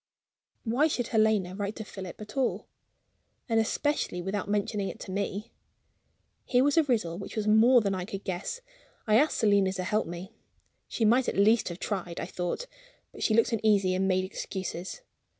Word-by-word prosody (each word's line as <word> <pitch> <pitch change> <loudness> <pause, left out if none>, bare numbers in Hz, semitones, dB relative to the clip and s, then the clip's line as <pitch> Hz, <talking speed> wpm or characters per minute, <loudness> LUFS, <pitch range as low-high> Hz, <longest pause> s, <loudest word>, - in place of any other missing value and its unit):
Why 250 +7 +2
should 245 -6 -2
Helena 215 -5 +2
write 200 +2 -3
to 220 - -6
Philip 190 -3 -8
at 215 +2 -10
all 265 -2 0 0.8
and 225 -2 +2
especially 225 -3 0
without 190 +3 -3
mentioning 205 -1 -1
it - - -8
to - - -7
me? 200 +2 -3 0.9
Here 250 0 +3
was 285 0 +3
a 330 - +6
riddle 215 - -1
which 195 - -8
was 215 -2 -1
more 230 +4 +6
than 200 -2 0
I 185 -1 -3
could 195 0 -6
guess. 190 - -4 0.4
I 215 0 +4
asked 305 +3 +2
Selina 200 -4 +3
to 185 -1 -3
help 210 +4 0
me. 175 +2 -7 0.5
She 225 - -1
might 245 +4 +4
at - - -4
least 215 +2 +4
have 175 +1 -7
tried, 180 -4 -3
I - - -3
thought; 180 - -3 0.5
but - - -12
she 215 - +2
looked 230 +1 +3
uneasy, 205 -4 +3
and 190 +1 +1
made 185 -1 +2
excuses. 190 - -5
210 Hz, 185 wpm, -28 LUFS, 190-230 Hz, 0.9 s, a